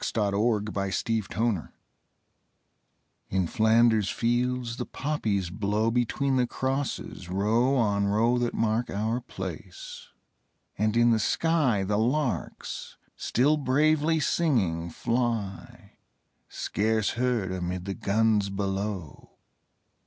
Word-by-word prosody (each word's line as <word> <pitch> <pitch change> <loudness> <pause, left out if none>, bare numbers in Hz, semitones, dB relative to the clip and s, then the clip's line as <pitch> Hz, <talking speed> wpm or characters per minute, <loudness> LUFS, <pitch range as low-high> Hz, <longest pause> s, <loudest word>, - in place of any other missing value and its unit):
L.} 105 +1 +2
IN 105 - -5
FLANDERS 100 -2 -2
FIELDS 110 - -1 1.6
In 95 -1 +1
Flanders 110 +1 +3
fields 120 0 0
the - - -3
poppies 105 - -2
grow 105 +3 0
Between 130 +3 +1
the 125 -1 +2
crosses, 130 -9 -3
row 110 +8 +2
on 100 -5 +2
row 115 +4 +2
That 120 -1 -1
mark 115 +2 0
our 110 +4 -1
place: 95 -7 -8 0.7
and 110 +2 0
in 120 0 +5
the 110 - +3
sky 145 -5 +1
The 105 +2 0
larks 130 +3 -2 0.2
still 145 +6 +2
bravely 155 +3 +2
singing, 100 - +1
fly 115 -2 -3 0.5
Scarce 110 0 0
heard 120 -6 0
amid 90 0 -3
the 100 - -3
guns 105 0 +1
below. 95 -4 -4
110 Hz, 110 wpm, -27 LUFS, 100-125 Hz, 1.6 s, in